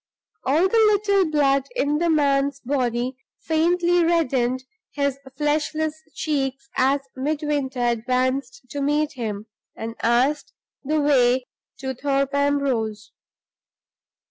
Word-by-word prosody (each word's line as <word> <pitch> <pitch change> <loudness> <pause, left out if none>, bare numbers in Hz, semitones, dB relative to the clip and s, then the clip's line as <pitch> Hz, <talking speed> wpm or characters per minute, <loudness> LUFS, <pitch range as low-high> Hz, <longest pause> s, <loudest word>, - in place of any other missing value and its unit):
All 310 +8 +3
the 455 - +1 0.2
little 400 -4 +2
blood 275 -3 +2
in 295 -10 +1
the 340 0 +1
man's 280 -2 +2
body 250 -1 -1 0.3
faintly 345 +2 +2
reddened 260 -7 +1 0.3
his 280 -2 -1 0.2
fleshless 310 +1 -1
cheeks 270 -3 -2
as 270 +2 +2
Midwinter 285 -2 -2
advanced 255 - 0
to 285 - -3
meet 295 +1 +1
him, 215 -5 -4 0.3
and 225 +1 -5
asked 250 +6 +1 0.3
the 305 +3 0
way 260 -3 +3 0.3
to 265 0 -4
Thorpe 275 +1 -1
Ambrose. 270 -7 0
280 Hz, 110 wpm, -23 LUFS, 255-305 Hz, 0.3 s, All